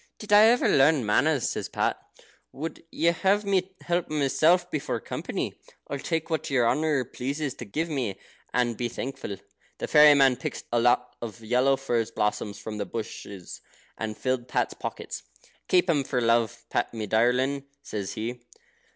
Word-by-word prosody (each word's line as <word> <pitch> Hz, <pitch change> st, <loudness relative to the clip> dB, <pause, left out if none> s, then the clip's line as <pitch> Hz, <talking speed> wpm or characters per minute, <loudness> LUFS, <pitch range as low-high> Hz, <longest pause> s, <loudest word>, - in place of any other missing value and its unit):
"Did 210 Hz, -1 st, -3 dB
I 210 Hz, +1 st, +9 dB
ever 240 Hz, +2 st, +4 dB
learn 140 Hz, -2 st, +4 dB
manners?" 135 Hz, +6 st, +2 dB
says -, -, -4 dB
Pat. -, -, 0 dB, 0.6 s
"Would 160 Hz, +4 st, -6 dB
you 170 Hz, +1 st, +2 dB
have 200 Hz, +4 st, +2 dB
me 190 Hz, -1 st, 0 dB
help 175 Hz, 0 st, -1 dB
myself 155 Hz, +4 st, +2 dB
before 150 Hz, -, -2 dB
company? -, -, -4 dB, 0.3 s
I'll 140 Hz, -, -4 dB
take 160 Hz, +2 st, -2 dB
what 160 Hz, -, -1 dB
your 125 Hz, -4 st, +3 dB
honour 145 Hz, 0 st, +1 dB
pleases 140 Hz, +4 st, -3 dB
to 120 Hz, -, -7 dB
give 155 Hz, +11 st, -2 dB
me, 125 Hz, -, -3 dB, 0.3 s
and 120 Hz, -2 st, +1 dB
be 120 Hz, +2 st, -2 dB
thankful." 120 Hz, -5 st, -5 dB, 0.4 s
The -, -, -4 dB
fairy 150 Hz, -1 st, +8 dB
man 135 Hz, -3 st, +5 dB
picked 130 Hz, -, -5 dB
a 120 Hz, -, +3 dB
lot 125 Hz, +1 st, +2 dB
of 115 Hz, -1 st, -7 dB
yellow 125 Hz, +4 st, +2 dB
furze 120 Hz, -4 st, -1 dB
blossoms 105 Hz, -2 st, -1 dB
from 105 Hz, -1 st, -6 dB
the 100 Hz, -, -1 dB
bushes, 100 Hz, -4 st, -7 dB, 0.3 s
and 110 Hz, -1 st, -4 dB
filled 130 Hz, -2 st, -1 dB
Pat's -, -, 0 dB
pockets. -, -, -6 dB, 0.5 s
"Keep 180 Hz, 0 st, +4 dB
'em 150 Hz, -5 st, +2 dB
for 130 Hz, -1 st, -1 dB
love, 115 Hz, -2 st, +1 dB
Pat, -, -, 0 dB
me 110 Hz, -1 st, -3 dB
darlin'," 125 Hz, +6 st, +1 dB, 0.2 s
says 105 Hz, -7 st, -4 dB
he. 120 Hz, +3 st, -4 dB
130 Hz, 170 wpm, -27 LUFS, 115-155 Hz, 0.6 s, I